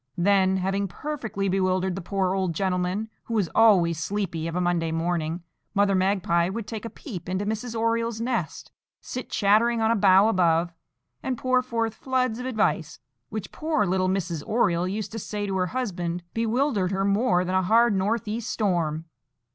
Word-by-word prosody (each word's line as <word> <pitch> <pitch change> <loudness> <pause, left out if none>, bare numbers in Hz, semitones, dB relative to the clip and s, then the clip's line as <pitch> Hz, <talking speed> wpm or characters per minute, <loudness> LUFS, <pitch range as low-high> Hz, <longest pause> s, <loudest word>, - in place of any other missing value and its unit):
Then, 190 +1 +3
having 195 +2 -1
perfectly 220 -3 -4
bewildered 185 0 +1
the 190 - -5
poor 190 +1 -1
old 190 -4 -1
gentleman, 185 +3 -1 0.2
who 230 - -3
was 200 -6 0
always 180 -8 +4
sleepy 170 -3 -2
of 165 - -4
a - - +1
Monday 175 -2 0
morning, 165 0 -2 0.3
Mother 200 0 +3
Magpie 185 -2 +2
would 220 +2 -4
take 220 0 -6
a - - -4
peep 180 - -8
into 190 +2 -1
Mrs. 225 +2 -3
Oriole's 230 0 0
nest, 230 -8 -3 0.3
sit 255 - -6
chattering 225 +3 +3
on 225 0 +2
a - - +3
bough 195 0 +5
above, 170 -4 +2 0.5
and 260 -2 -2
pour 255 +1 +2
forth 230 -3 -2
floods 255 -2 -1
of 250 - -4
advice, 205 - 0 0.3
which, 215 -2 -5
poor 310 -7 0
little 185 0 +1
Mrs. 180 -4 -2
Oriole 180 -6 +1
used 205 +3 -4
to 225 - -5
say 205 0 -4
to 195 -1 -2
her 180 -1 +1
husband, 175 -7 -3
bewildered 230 -3 +1
her 195 0 0
more 200 -3 +2
than 185 - -2
a 185 - +3
hard 230 +4 +4
north 205 +4 0
east 225 +2 -3
storm. 165 -7 0
195 Hz, 180 wpm, -25 LUFS, 180-225 Hz, 0.5 s, bough